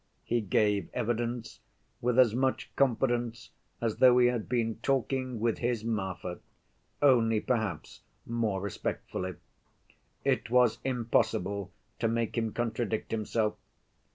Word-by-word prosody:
He 120 0 0
gave 105 -2 +1
evidence 120 0 -2 0.4
with 120 0 +1
as 125 -4 +6
much 130 +2 -1
confidence 120 -3 0 0.3
as 115 -2 -1
though 125 -1 +7
he 125 - +6
had 120 -3 -3
been 115 -3 0
talking 130 -2 0
with 115 0 0
his 120 -2 -1
Marfa, 95 -5 -3 0.6
only 115 -5 +5
perhaps 110 -10 -2 0.2
more 115 -5 -1
respectfully. 95 -2 -4 0.9
It - - +1
was 125 -2 +4
impossible 110 -6 0 0.3
to 115 - +2
make 115 0 -1
him 115 -2 0
contradict 115 -2 -2
himself. 110 0 0
115 Hz, 120 wpm, -30 LUFS, 105-120 Hz, 0.9 s, though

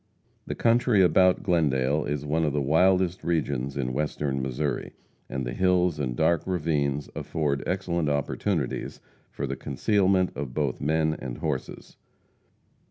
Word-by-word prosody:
The - - -3
country 115 -3 +3
about 90 0 +4
Glendale 75 -6 +1
is 75 0 -3
one 80 +3 0
of 75 -3 0
the 75 - +1
wildest 90 +5 +2
regions 70 -5 -1
in 65 -2 -2
Western 70 -1 -1
Missouri, 65 +3 -2 0.4
and 65 -1 -3
the - - -4
hills 90 -3 +2
and 65 -4 -2
dark 80 +5 +2
ravines 75 -5 0
afford 70 -3 -2
excellent 85 -4 -1
opportunities 70 +2 -2 0.3
for - - -4
the - - -3
concealment 95 -3 +1
of 65 -2 -5
both 70 -5 -1
men 80 +1 +1
and 60 -2 -6
horses. 70 -4 -5
75 Hz, 140 wpm, -26 LUFS, 70-90 Hz, 0.4 s, about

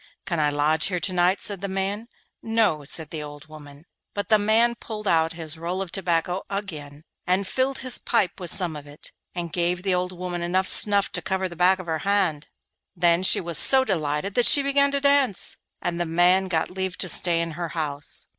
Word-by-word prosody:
'Can 170 -3 -3
I 150 -1 +2
lodge 150 +2 +1
here 180 -2 -3
to 185 +2 -1
night?' 180 +2 +1
said 200 -3 -5
the 200 - -3
man. 195 +3 -3 0.3
'No,' 225 -9 0
said 155 +2 -1
the 155 - -5
old 145 0 -10
woman. 150 -1 -14 0.3
But 205 - -4
the 215 -1 +4
man 225 +3 +2
pulled 215 -3 -8
out 165 -2 +1
his 160 -1 -4
roll 175 +3 -4
of 190 -3 -5
tobacco 175 0 -1
again, 155 -8 -7 0.2
and 185 +2 0
filled 265 +4 -1
his 255 - +2
pipe 220 -6 -1
with 180 -2 -5
some 175 -5 0
of 145 -1 -10
it, 145 +1 -10 0.2
and 170 -3 -5
gave 175 +1 -1
the 195 -2 0
old 180 0 -1
woman 180 -1 -6
enough 185 +2 0
snuff 200 -1 +5
to - - -1
cover 190 0 -2
the 175 - -11
back 180 +2 +3
of 185 - -9
her 160 -2 -3
hand. 190 -7 -1 0.5
Then 170 0 +2
she 190 - +2
was 170 -2 +2
so 265 -1 +6
delighted 155 - -2
that 245 +1 +3
she 285 - +8
began 280 0 +2
to 280 - -1
dance, 280 -7 +1 0.3
and 175 -1 -3
the - - -1
man 180 +3 +2
got 165 -2 -2
leave 190 0 -4
to 185 - -3
stay 170 -1 +4
in 165 0 -3
her 170 +1 -5
house. 145 -2 -2
180 Hz, 215 wpm, -23 LUFS, 160-200 Hz, 0.5 s, she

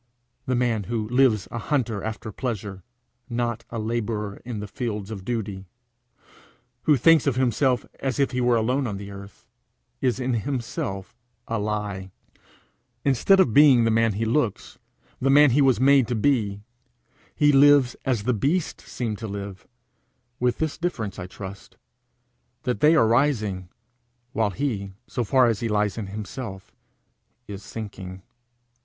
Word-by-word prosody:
The 130 - +1
man 120 -4 0
who 110 -1 -2
lives 125 -5 +3
a 115 - -4
hunter 115 -7 -1
after 110 0 -5
pleasure, 105 -5 -4 0.5
not 120 -1 -2
a 115 - -5
labourer 110 -2 -3
in 120 -3 -5
the 105 - -5
fields 105 -1 -4
of 100 -4 -6
duty, 100 -4 -4 1.2
who 150 - +6
thinks 160 +3 +5
of 135 - +2
himself 130 0 +1
as 135 -3 -2
if 140 - +2
he 125 -1 -1
were 120 -1 +3
alone 125 +4 +1
on 100 -3 -4
the 100 0 -8
earth, 100 0 -12 0.6
is 125 -1 +1
in 130 0 -1
himself 115 -6 -4 0.3
a 115 -1 -1
lie. 105 -2 -3 1.0
Instead 140 - +4
of 130 - +4
being 140 -4 +7
the 115 - +2
man 115 -1 +3
he 110 +3 -2
looks, 115 -2 -1 0.4
the 135 - +1
man 145 0 +7
he 140 +4 +3
was 130 -5 +4
made 135 -2 +5
to 120 - -1
be, 105 -4 +1 0.7
he 145 -1 +4
lives 140 -2 +5
as 120 -6 0
the 125 +3 +1
beasts 145 - -1
seem 115 -4 -2
to 110 - -6
live 100 -1 -7 0.7
with 125 -1 +1
this 160 -2 -2
difference, 115 - -3
I 90 - -5
trust, 100 +1 -10 0.9
that 125 -1 -1
they 150 +3 +5
are 115 -7 +5
rising, 110 -7 +1 0.6
while 110 -1 +1
he, 100 -3 -3
so 125 - -3
far 130 +4 +4
as 115 -1 0
lies 105 -3 0
in 110 -3 -5
himself, 105 0 -7 0.8
is 100 -2 -7
sinking. 95 -4 -8
115 Hz, 155 wpm, -24 LUFS, 105-130 Hz, 1.2 s, being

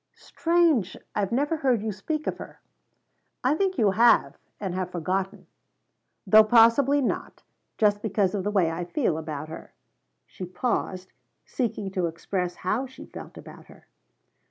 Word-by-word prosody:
"Strange 325 - +1 0.2
I've 200 -2 -1
never 290 +6 0
heard 255 -7 +1
you 220 - -2
speak 300 +11 -4
of - - -3
her." - - -10 0.8
"I 255 +3 +3
think 380 +2 0
you 215 -5 +3
have, 235 +4 +4 0.2
and 195 -3 -3
have 185 -1 -3
forgotten. 185 +3 -3 0.8
Though 215 0 +7
possibly 240 +6 +5
not 255 - -3 0.3
just 205 -2 +2
because 205 -3 0
of 200 -3 -2
the 205 - -1
way 190 -6 +2
I 170 +2 -4
feel 175 - -1
about 155 -1 -6
her." - - -10 0.5
She - - -10
paused, 185 -1 -3 0.3
seeking 215 -6 -3
to 185 -2 0
express 175 +2 -3
how 235 +8 0
she 260 - -12
felt - - -11
about - - -12
her. - - -18
210 Hz, 155 wpm, -26 LUFS, 185-255 Hz, 0.8 s, Though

